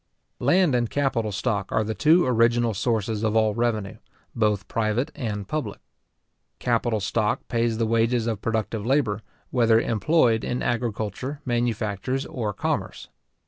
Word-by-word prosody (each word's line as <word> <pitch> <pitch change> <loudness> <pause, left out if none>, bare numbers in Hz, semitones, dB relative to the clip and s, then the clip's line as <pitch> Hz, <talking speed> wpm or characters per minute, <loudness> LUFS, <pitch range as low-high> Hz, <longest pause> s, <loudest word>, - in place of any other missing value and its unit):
Land 160 +4 +3
and 120 -2 +1
capital 130 -6 0
stock 100 -1 -2
are 110 - +2
the 110 +1 -3
two 155 - +4
original 120 -1 +3
sources 110 0 -1
of 110 -1 0
all 110 -1 +3
revenue, 110 -4 -1 0.4
both 105 -3 +1
private 115 +6 -1
and 105 -8 -4
public. 120 -6 -3 0.8
Capital 120 -2 0
stock 105 +2 -1
pays 115 -2 0
the 115 - +1
wages 115 +1 +1
of 110 -3 -2
productive 110 -1 -2
labour, 115 -4 +1 0.3
whether 115 -3 +4
employed 115 0 +2
in 125 - -2
agriculture, 120 +3 -2
manufactures, 120 +1 -1
or 110 -5 -3
commerce. 95 - -3
115 Hz, 140 wpm, -25 LUFS, 110-125 Hz, 0.8 s, two